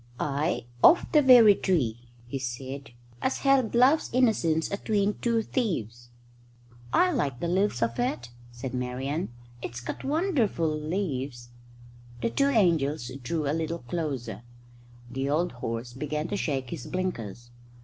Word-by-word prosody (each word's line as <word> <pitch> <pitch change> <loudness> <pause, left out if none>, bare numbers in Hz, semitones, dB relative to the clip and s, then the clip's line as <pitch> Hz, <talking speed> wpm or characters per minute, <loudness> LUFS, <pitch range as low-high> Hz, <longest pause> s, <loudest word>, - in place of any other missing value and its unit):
"Aye, 145 0 -1 0.2
of 350 - +7
the 300 - +6
very 245 -6 +8
tree," 120 - -1 0.2
he 135 +3 -4
said, 130 +2 -5 0.3
"as 260 - 0
held 270 -4 +2
Love's 265 +6 +4
Innocence 215 -11 +2
atween 205 0 0
two 230 -2 +1
thieves." 120 - -3 0.8
"I 365 - +4
like 140 - -1
the 170 - -2
leaves 180 - +1
of 115 0 -2
it," 120 0 -1 0.2
said 120 +2 -6
Marian. 130 +6 -2 0.3
"It's 120 - -5
got 120 - -6
wonderful 280 - +1
leaves." 145 -7 -3 0.7
The 230 - -1
two 275 - +2
angels 160 - +2
drew 150 +4 -2
a 145 - +1
little 165 +1 -2
closer. 125 - -4 0.7
The 135 +2 -2
old 165 +5 +1
horse 120 0 -5
began 150 +4 -3
to - - -1
shake 135 -9 -2
his 150 -7 -6
blinkers. 120 - -4
150 Hz, 140 wpm, -27 LUFS, 125-205 Hz, 0.8 s, very